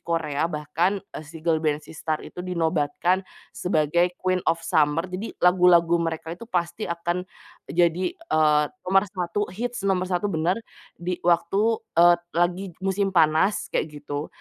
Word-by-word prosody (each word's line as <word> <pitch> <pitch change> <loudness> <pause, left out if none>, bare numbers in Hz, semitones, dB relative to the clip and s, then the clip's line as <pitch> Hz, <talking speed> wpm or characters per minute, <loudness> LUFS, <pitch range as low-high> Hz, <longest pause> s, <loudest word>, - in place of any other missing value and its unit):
Korea, 165 -2 -1
bahkan 165 +5 0 0.2
si 155 +1 -12
girl 160 -2 +2
band 150 -1 -1
SISTAR 155 0 -4
itu 180 - -8
dinobatkan 175 0 0 0.3
sebagai 175 +1 +1
Queen 185 0 0
of 165 0 0
Summer. 150 +2 +2
Jadi, 185 +4 -6
lagu-lagu 175 -2 +5
mereka 165 0 -3
itu 230 +6 -10
pasti 175 +2 -2
akan 170 +1 -2 0.5
jadi, 175 - +1
eee, 155 - +2 0.2
nomor 195 +1 +5
1 180 +2 -1
hits 240 0 -4
nomor 185 -2 +1
1. 180 +1 -1
Benar 165 +5 +1 0.4
di 175 +1 -4
waktu 175 +4 +2 0.7
lagi 175 +2 0
waktu - - -31
musim 195 0 0
panas 160 +4 +3
gitu. 145 -1 -3
170 Hz, 135 wpm, -24 LUFS, 160-185 Hz, 0.7 s, lagu-lagu